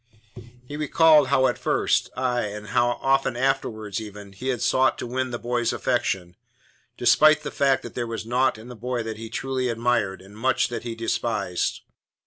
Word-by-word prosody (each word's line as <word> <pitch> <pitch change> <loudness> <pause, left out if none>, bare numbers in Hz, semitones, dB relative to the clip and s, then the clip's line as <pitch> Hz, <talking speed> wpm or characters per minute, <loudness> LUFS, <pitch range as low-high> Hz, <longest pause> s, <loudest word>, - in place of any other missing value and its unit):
He 145 - -7
recalled 155 -1 +5
how 130 -1 +3
at 125 - 0
first - - +1
aye, 125 -2 0
and 105 0 -7
often 125 +1 +1
afterwards 115 -6 -1
even 105 -2 -10
he 120 +7 -7
had 125 -3 -1
sought 130 +1 +3
to - - -5
win 130 +2 -2
the 120 - -4
boy's 120 0 -1
affection, 95 -8 -1 0.6
despite 155 0 +5
the - - -4
fact 135 -1 +2
that - - -8
there 120 -1 -3
was 115 -1 -5
naught 125 +1 +1
in 110 +2 -12
the 125 - -9
boy 120 +1 -3
that 110 -1 -5
he 115 0 -8
truly 130 +1 -2
admired, 115 -5 0
and 95 +2 -15
much 130 +4 +1
that 120 -2 -4
he 115 -1 -5
despised. 110 -5 -2
120 Hz, 180 wpm, -24 LUFS, 110-130 Hz, 0.6 s, recalled